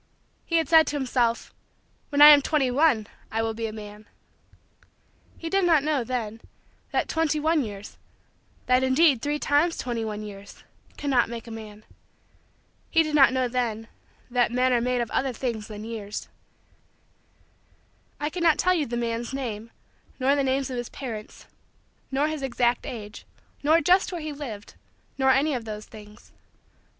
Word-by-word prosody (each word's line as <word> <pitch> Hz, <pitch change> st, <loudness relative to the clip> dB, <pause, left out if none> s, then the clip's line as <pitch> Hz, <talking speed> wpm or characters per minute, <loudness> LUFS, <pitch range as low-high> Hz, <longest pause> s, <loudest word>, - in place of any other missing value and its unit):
He 335 Hz, -, -1 dB
had 325 Hz, -, +1 dB
said 320 Hz, -3 st, +6 dB
to 295 Hz, -, -2 dB
himself: 245 Hz, -4 st, 0 dB, 0.6 s
"when 290 Hz, 0 st, +5 dB
I 300 Hz, -, +12 dB
am 295 Hz, -1 st, +8 dB
twenty 275 Hz, -3 st, +1 dB
one, 260 Hz, -5 st, +3 dB, 0.3 s
I 225 Hz, +1 st, 0 dB
will 225 Hz, 0 st, -1 dB
be 225 Hz, 0 st, -3 dB
a -, -, -6 dB
man." 210 Hz, 0 st, -10 dB, 1.3 s
He 330 Hz, -, -6 dB
did 390 Hz, +3 st, +1 dB
not 325 Hz, -5 st, +4 dB
know, 295 Hz, -4 st, 0 dB
then, 230 Hz, -2 st, -4 dB, 0.5 s
that -, -, 0 dB
twenty 320 Hz, -2 st, 0 dB
one 315 Hz, 0 st, +2 dB
years 205 Hz, -2 st, -9 dB, 0.7 s
that 255 Hz, 0 st, +3 dB
indeed 260 Hz, 0 st, +4 dB
three 295 Hz, +2 st, -1 dB
times 300 Hz, +4 st, +1 dB
twenty 235 Hz, -2 st, -3 dB
one 215 Hz, -1 st, -4 dB
years 200 Hz, -1 st, -11 dB, 0.3 s
cannot 265 Hz, -5 st, +1 dB
make 235 Hz, -1 st, -7 dB
a 230 Hz, -, -10 dB
man. 215 Hz, -1 st, -9 dB, 1.1 s
He 325 Hz, -, +4 dB
did 310 Hz, -1 st, -4 dB
not 275 Hz, -4 st, +6 dB
know, 260 Hz, -1 st, 0 dB
then, 230 Hz, -3 st, -2 dB, 0.4 s
that 245 Hz, -1 st, +2 dB
men 255 Hz, +1 st, +2 dB
are 240 Hz, -, +2 dB
made 250 Hz, 0 st, 0 dB
of 235 Hz, -, -4 dB
other 265 Hz, -1 st, 0 dB
things 230 Hz, -3 st, -4 dB
than 210 Hz, -1 st, -8 dB
years. 220 Hz, -2 st, -6 dB, 1.9 s
I 295 Hz, +1 st, -2 dB
cannot 335 Hz, -2 st, +2 dB
tell 365 Hz, -, +3 dB
you 315 Hz, -5 st, 0 dB
the 240 Hz, +1 st, -3 dB
man's 235 Hz, +1 st, -3 dB
name, 230 Hz, -4 st, -5 dB, 0.5 s
nor 265 Hz, +2 st, +3 dB
the 280 Hz, -, +1 dB
names 265 Hz, 0 st, 0 dB
of 250 Hz, -, -4 dB
his 240 Hz, -1 st, -4 dB
parents, 225 Hz, -6 st, -8 dB, 0.6 s
nor 280 Hz, +2 st, +1 dB
his 310 Hz, -2 st, -4 dB
exact 245 Hz, -2 st, 0 dB
age, 210 Hz, -3 st, -8 dB, 0.4 s
nor 315 Hz, +3 st, +4 dB
just 365 Hz, +6 st, +3 dB
where 350 Hz, -2 st, -5 dB
he 305 Hz, -1 st, -5 dB
lived, 235 Hz, -8 st, -8 dB, 0.5 s
nor 265 Hz, 0 st, +3 dB
any 280 Hz, +3 st, +3 dB
of 240 Hz, -3 st, -4 dB
those 215 Hz, -1 st, -6 dB
things. 210 Hz, -1 st, -15 dB
255 Hz, 170 wpm, -25 LUFS, 225-295 Hz, 1.9 s, I